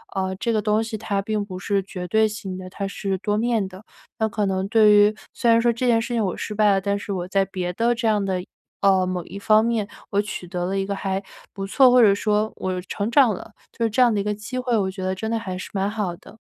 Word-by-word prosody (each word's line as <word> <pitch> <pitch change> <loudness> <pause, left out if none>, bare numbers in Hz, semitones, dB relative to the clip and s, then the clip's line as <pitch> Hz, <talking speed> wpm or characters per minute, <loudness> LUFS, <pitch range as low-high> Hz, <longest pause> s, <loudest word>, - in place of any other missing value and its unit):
呃， 190 -1 -1
这 230 +4 -1
个 215 - +1
东 210 +1 +2
西 220 0 -5
它 205 -2 -2
并 215 0 -1
不 190 -2 -7
是 195 +2 0
绝 180 -1 -7
对 220 +4 +3
性 205 -3 -6
的， 185 0 -8
它 195 +1 -4
是 195 -1 -3
多 205 +2 -1
面 225 -2 +1
的， 190 +2 -12 0.4
那 220 0 +1
可 210 -1 -1
能 190 0 -1
对 215 0 +5
于 205 +1 +5 0.2
虽 235 - 0
然 230 - +6
说 235 0 +3
这 250 +2 -1
件 230 -1 +4
事 235 +2 -3
情 230 -2 +1
我 185 - -2
失 215 - -4
败 210 0 +3
了， 195 - +2
但 200 +1 -1
是 205 - -6
我 180 -2 -3
在 195 +1 +2
别 180 -2 -4
的 235 +4 +1
这 230 0 -1
样 210 -2 +2
的 190 -2 -1 0.4
呃， 190 -2 +4
某 180 -2 -2
一 200 - -8
方 215 +2 +4
面 225 -3 0 0.2
我 200 - +2
取 210 -3 -6
得 175 0 -3
了 195 +1 -1
一 195 - 0
个 200 - -3
还 195 0 -2 0.3
不 195 -1 -5
错 255 +6 +5
或 250 0 +5
者 210 -4 +7
说 210 +1 0
我 185 -1 -2
成 200 +3 -3
长 240 -2 +5
了， 205 +3 -9 0.2
就 235 - -4
是 225 - +2
这 225 +4 -3
样 245 -2 +5
的 205 - 0
一 - - -3
个 210 0 -1
机 230 +5 -5
会， 250 -2 0
我 190 -2 0
觉 190 0 -7
得 185 0 -1
真 220 +4 -4
的 230 - 0
还 185 -4 -5
是 185 - -7
蛮 195 0 0
好 205 -5 -3
的。 220 - -16
205 Hz, 300 characters per minute, -23 LUFS, 190-220 Hz, 0.4 s, 者